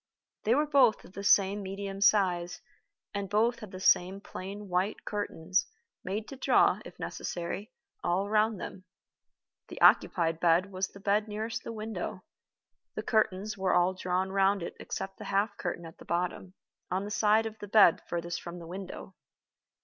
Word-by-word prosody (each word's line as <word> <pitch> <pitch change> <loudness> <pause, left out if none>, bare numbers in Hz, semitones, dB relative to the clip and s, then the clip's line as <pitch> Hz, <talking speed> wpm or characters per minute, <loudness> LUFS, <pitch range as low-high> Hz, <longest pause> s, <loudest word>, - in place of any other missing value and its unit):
They 225 +3 +4
were 300 +2 +3
both 275 -6 +4
of 180 - -16
the 200 - -6
same 200 0 +4
medium 195 0 -5
size, 180 -4 +3 0.5
and 200 -1 -3
both 230 +4 +2
had 215 - -9
the 185 - -8
same 185 +1 +3
plain 200 +1 -8
white 185 +3 -1
curtains, 185 -3 -1 0.4
made 205 +4 -3
to 275 - -7
draw, 260 - +3
if - - -12
necessary, 180 +4 -5 0.3
all 185 +3 +1
round 215 0 +2
them. 185 - -8 0.8
The - - -9
occupied 165 -2 +4
bed 175 +3 +3
was 185 0 -1
the 200 - -14
bed 205 +2 +1
nearest 220 +2 -4
the - - -5
window. 220 0 -5 0.7
The - - -3
curtains 215 -2 0
were 190 -1 +2
all 180 +1 +3
drawn 185 0 -1
round 195 -1 +2
it - - -6
except 195 0 -5
the - - -7
half 200 +1 0
curtain 175 -1 -4
at 165 - -12
the - - -12
bottom, 180 +2 -2 0.3
on 185 +2 -1
the 205 - -6
side 215 +1 +3
of 220 0 -6
the 205 - -7
bed 200 -4 +6
furthest 170 0 -3
from 170 0 -7
the 170 - -9
window. 190 +2 -8
195 Hz, 170 wpm, -30 LUFS, 180-210 Hz, 0.8 s, bed